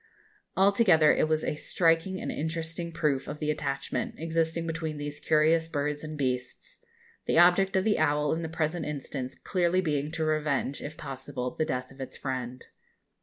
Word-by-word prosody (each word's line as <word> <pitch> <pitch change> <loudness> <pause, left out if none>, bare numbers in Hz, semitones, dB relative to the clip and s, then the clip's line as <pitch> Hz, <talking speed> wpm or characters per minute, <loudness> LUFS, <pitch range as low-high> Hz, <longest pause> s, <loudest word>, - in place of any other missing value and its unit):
Altogether 190 -5 +5
it - - +2
was 155 0 +1
a - - 0
striking 165 +4 +1
and - - -3
interesting 165 +2 -3
proof 150 -5 0
of 145 - -5
the 150 0 0
attachment 140 -2 -3
existing 165 +1 -1
between 160 -2 -3
these 145 0 -5
curious 160 +2 +3
birds 150 -1 -2
and 155 0 -6
beasts; 125 - -3 0.4
the - - +2
object 180 +3 +5
of 190 - +3
the 215 0 +2
owl 150 -1 +2
in 165 - -2
the 165 - -4
present 160 +1 -1
instance 140 -3 -5
clearly 180 -1 +1
being 150 -4 0
to 160 -1 -1
revenge 150 -3 0
if 150 +2 -7
possible 130 -2 -5
the 155 - 0
death 125 -4 -3
of 135 0 -11
its 130 - -6
friend. 130 -2 -4
155 Hz, 170 wpm, -28 LUFS, 145-165 Hz, 0.4 s, Altogether